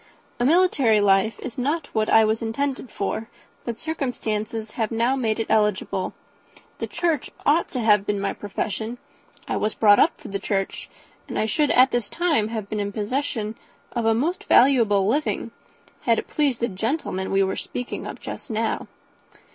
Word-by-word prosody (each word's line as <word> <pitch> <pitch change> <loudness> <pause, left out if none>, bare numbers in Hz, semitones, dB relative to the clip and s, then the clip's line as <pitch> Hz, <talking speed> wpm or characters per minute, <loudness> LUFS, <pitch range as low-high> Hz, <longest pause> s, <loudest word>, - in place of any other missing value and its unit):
A 240 - +2
military 285 - +4
life 200 +2 +3
is 255 -1 -6
not 285 +4 -2
what 215 -1 +1
I 220 0 +6
was 220 +1 0
intended 260 +3 -2
for, 220 +3 -3 0.4
but 235 -2 -3
circumstances 225 -7 -3
have 220 -2 -1
now 235 +3 +1
made 230 -4 0
it 225 - 0
eligible. 210 -2 0 0.6
The - - -2
church 335 -5 -1 0.2
ought 310 +4 +3
to 255 - -3
have 210 -3 +3
been 205 -1 0
my 200 - -1
profession 220 +3 -4 0.5
I - - -1
was 215 - -1
brought 205 -2 +6
up 330 - +3
for 280 -8 -10
the 200 0 -3
church; 195 0 -2 0.4
and - - -5
I - - +1
should 290 +7 +1
at 255 +1 +5
this 240 -4 0
time 320 -11 +1
have 220 -3 -4
been 210 +1 -3
in 200 0 -2
possession 220 0 -2 0.4
of 235 -2 -2
a 225 - +4
most 320 +10 -1
valuable 230 -7 +5
living, 290 +8 0 0.5
had 230 -2 +2
it - - -3
pleased 280 -6 0
the 235 - +2
gentleman 195 - -2
we 195 0 +3
were 190 - -1
speaking 250 0 -5
of - - -7
just - - -8
now." 225 0 -1
225 Hz, 180 wpm, -24 LUFS, 210-265 Hz, 0.6 s, I